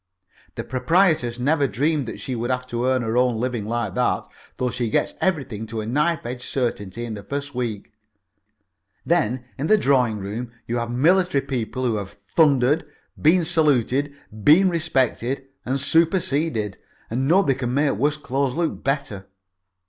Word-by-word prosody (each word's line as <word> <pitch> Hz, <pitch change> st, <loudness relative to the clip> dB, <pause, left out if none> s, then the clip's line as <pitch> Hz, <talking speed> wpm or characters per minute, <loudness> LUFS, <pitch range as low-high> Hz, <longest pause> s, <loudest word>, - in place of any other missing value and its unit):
The -, -, -4 dB
proprietoress 155 Hz, -3 st, +2 dB
never 140 Hz, +3 st, +2 dB
dreamed 140 Hz, +5 st, 0 dB
that -, -, -6 dB
she 130 Hz, -, -4 dB
would 120 Hz, +1 st, -3 dB
have 125 Hz, 0 st, -1 dB
to 120 Hz, +1 st, -1 dB
earn 130 Hz, -1 st, +2 dB
her 115 Hz, +1 st, -1 dB
own 125 Hz, -3 st, +2 dB
living 120 Hz, -3 st, -2 dB
like 115 Hz, -3 st, -2 dB
that -, -, 0 dB, 0.3 s
though 125 Hz, -1 st, -1 dB
she 120 Hz, -2 st, -2 dB
gets -, -, +1 dB
everything 135 Hz, -, -1 dB
to 115 Hz, 0 st, -5 dB
a 110 Hz, -, -3 dB
knife 150 Hz, +7 st, 0 dB
edge 120 Hz, +1 st, -5 dB
certainty 120 Hz, -4 st, -3 dB
in 115 Hz, -, -5 dB
the 105 Hz, -, -6 dB
first 140 Hz, +6 st, -5 dB
week. 120 Hz, -5 st, -4 dB, 1.1 s
Then 130 Hz, -7 st, +1 dB
in 145 Hz, -, -1 dB
the 215 Hz, -, +5 dB
drawing 130 Hz, -, +2 dB
room 105 Hz, +5 st, -5 dB
you 120 Hz, -, -2 dB
have 120 Hz, 0 st, -2 dB
military 160 Hz, +4 st, +2 dB
people 130 Hz, -1 st, -3 dB
who 115 Hz, -3 st, +1 dB
have 100 Hz, -1 st, -7 dB, 0.2 s
thundered, 145 Hz, -1 st, +4 dB, 0.4 s
been 165 Hz, +3 st, +4 dB
saluted, 145 Hz, -4 st, +1 dB, 0.3 s
been 185 Hz, -, +6 dB
respected 135 Hz, -5 st, -1 dB, 0.2 s
and 135 Hz, +2 st, 0 dB
superseded. 150 Hz, -, +1 dB, 0.3 s
And 130 Hz, +4 st, 0 dB
nobody 170 Hz, -3 st, +4 dB
can 125 Hz, -2 st, -2 dB
make 145 Hz, 0 st, +3 dB
worse 145 Hz, +7 st, 0 dB
clothes 135 Hz, -2 st, -1 dB
look 170 Hz, -1 st, -2 dB
better. 135 Hz, -9 st, -2 dB
130 Hz, 165 wpm, -23 LUFS, 120-150 Hz, 1.1 s, been